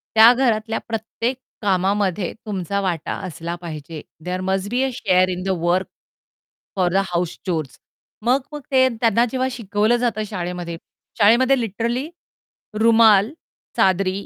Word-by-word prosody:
त्या 225 +2 +9
घरातल्या 225 -3 0
प्रत्येक 230 +3 -3 0.2
कामामध्ये 195 -1 0
तुमचा 200 -1 -2
वाटा 175 -5 -2
असला 170 +1 -5
पाहिजे. 155 -2 -7 0.2
There 180 +1 -2
must 190 +1 -1
be 245 +3 0
a 270 - +1
share 185 -3 +2
in 180 0 -3
the 195 - -3
work 175 +2 +1 0.9
for 185 -2 +2
the - - +3
house 175 -1 -2
chores. 160 -7 -3 0.4
मग 255 +4 +2
मग 295 - -6
ते 260 0 +5
त्यांना 230 +1 +3
जेव्हा 260 0 0
शिकवलं 215 0 +1
जातं 230 -3 -1
शाळेमध्ये 175 -3 -4 0.4
शाळेमध्ये 250 +5 +5
लिटरली 235 - -2 0.7
रुमाल, 225 -1 +5 0.5
चादरी 190 +1 +1
205 Hz, 135 wpm, -21 LUFS, 180-230 Hz, 0.9 s, त्या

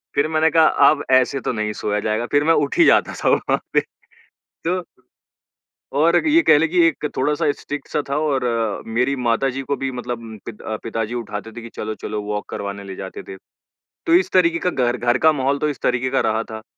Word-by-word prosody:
फिर 145 - +2
मैंने 160 0 +2
कहा 160 -1 +5 0.2
अब 150 -1 0
ऐसे 130 +2 +3
तो - - -2
नहीं 105 -1 -2
सोया 105 0 -2
जाएगा 110 +3 -1
फिर 145 0 +3
मैं 165 +2 +4
उठ - - -6
ही 340 - +6
जाता - - +4
था - - +3
वहाँ - - +1
पे। - - +4 0.8
तो 180 +2 0 1.2
और 170 +3 +4
ये 325 +3 +5
कह 150 - +6
लें 165 +2 +2
कि 180 +1 +2
एक 150 - -3
थोड़ा-सा 145 +2 +1
स्ट्रिक्ट 145 0 -6
सा 150 - -1
था 140 - 0
और 145 -4 0 0.4
मेरी 125 +5 0
माताजी 125 +2 0
को 140 +1 -2
भी 135 0 -3
मतलब 125 -1 -4
उम, 110 -1 -9
पित 105 - -9
अ, 110 - -4
पिताजी 115 0 -3
उठाते 115 -2 -5
थे 120 - -9
कि 115 - -8
चलो-चलो 105 -1 -4
वॉक 105 0 -4
करवाने 100 0 -5
ले 95 -1 -8
जाते 95 -1 -7
थे। 95 - -7 0.7
तो 165 - +4
इस 180 +1 +3
तरीके 170 -2 +3
का 180 - 0
घर, 125 -6 0
घर 120 +1 +1
का 160 +3 +5
माहौल 140 -1 0
तो 150 - 0
इस 145 -4 -4
तरीके 125 +1 0
का 135 - +1
रहा 110 +1 0
था 110 - -7
130 Hz, 220 wpm, -21 LUFS, 110-150 Hz, 1.2 s, ही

